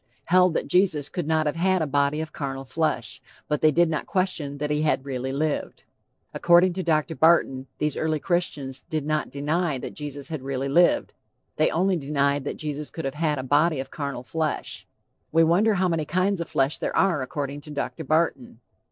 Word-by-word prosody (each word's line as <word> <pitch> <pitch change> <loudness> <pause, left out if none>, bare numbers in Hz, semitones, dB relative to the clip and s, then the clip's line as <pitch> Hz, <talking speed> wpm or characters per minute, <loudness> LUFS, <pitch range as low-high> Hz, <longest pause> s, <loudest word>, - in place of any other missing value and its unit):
held 180 -1 +4
that - - 0
Jesus 175 -6 +2
could 175 -4 -4
not 160 -1 +2
have 150 +2 -1
had 185 +2 +2
a 160 - 0
body 145 +1 +1
of 160 -1 -7
carnal 135 -2 -4
flesh; 130 -4 -2 0.3
but 150 - -1
they 155 - +6
did 170 +3 +3
not 160 -1 -3
question 170 -7 -1
that 150 +1 -2
he 150 0 +1
had 150 -3 +1
really 130 -1 -3
lived." 150 +2 -2 0.5
According 175 +1 +4
to 185 - -3
Dr. 160 -2 +1
Barton, 135 -5 +3
these 150 -1 0
early 155 -1 0
Christians 145 -7 -2
did 155 -2 -2
not 155 0 -1
deny 150 +2 -1
that - - -7
Jesus 145 -1 -7
had 155 -4 -4
really 135 0 -3
lived, 175 +5 +3 0.4
they 155 - +3
only 185 +2 +1
denied 140 -1 0
that - - -4
Jesus 150 -1 -5
could 165 - -6
have 135 - -2
had 150 -1 0
a 130 - -3
body 150 +3 +2
of 130 - -6
carnal 140 -4 -4
flesh. 155 +3 -3 0.4
We 165 +1 +5
wonder 195 +7 +3
how 185 0 +2
many 165 -3 0
kinds 185 +3 0
of 170 - -5
flesh 135 +2 0
there - - -2
are 175 -7 +3
according 140 +2 -4
to 150 - -12
Dr. 145 -1 -4
Barton. 170 +10 0
155 Hz, 200 wpm, -25 LUFS, 140-170 Hz, 0.5 s, they